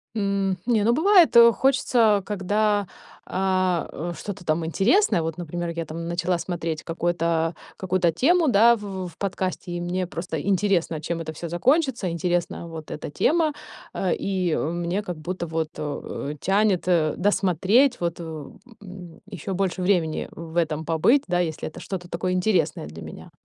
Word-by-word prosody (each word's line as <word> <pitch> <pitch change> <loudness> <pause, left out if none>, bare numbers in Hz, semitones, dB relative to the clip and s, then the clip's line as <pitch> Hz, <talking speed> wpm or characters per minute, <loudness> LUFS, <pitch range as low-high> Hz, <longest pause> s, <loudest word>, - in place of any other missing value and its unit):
М, 195 -2 0
не, 225 -4 +2
ну, 235 +2 +3
бывает, 355 0 +5
э, 235 0 +9
хочется, 230 -6 +2
когда, 205 0 0 0.4
а, 185 -2 0
э, 175 +3 -5
что-то 200 -3 -7
там 160 +1 0
интересное. 200 - +3
Вот, 160 0 -4
например, 175 0 -4
я 170 -1 -4
там 165 +2 -6
начала 175 +1 0
смотреть 165 -3 -4
какой-то 165 -1 -1 0.2
какую-то 185 -2 +1
тему, 330 - +3
да, 235 0 +6
в 195 -3 -6
в 160 - -19
подкасте, 185 -2 -3
и 175 - -3
мне 180 +1 -2
просто 175 0 -4
интересно, 190 -5 +1
чем 165 +1 -3
это 160 -1 -5
всё 170 +2 -6
закончится, 255 - +1
интересна 170 0 -2
вот 160 -2 -8
эта 150 - -5
тема, 315 - +2 0.4
а, 185 -3 -1
и, 185 -3 -1
э, - - +1
мне 175 +3 -2
как 180 -4 -5
будто 170 +2 -4
вот, 160 -1 -2
э, 150 0 -5
тянет, 195 -1 +2
э, 160 -4 +2
досмотреть, 205 - +2
вот, 170 -1 -2
в 160 -4 -8 0.2
м, 180 -3 -11
ещё 190 +2 -5
больше 185 -1 -1
времени 175 -4 0
в 165 0 -10
этом 160 -2 0
побыть, 200 - +3
да, 175 0 +1
если 160 -3 -2
это - - -9
что-то 180 -2 -6
такое 175 +2 -2
интересное 180 - +1
для 80 +2 -10
меня. - - -10
180 Hz, 165 wpm, -24 LUFS, 165-200 Hz, 0.4 s, э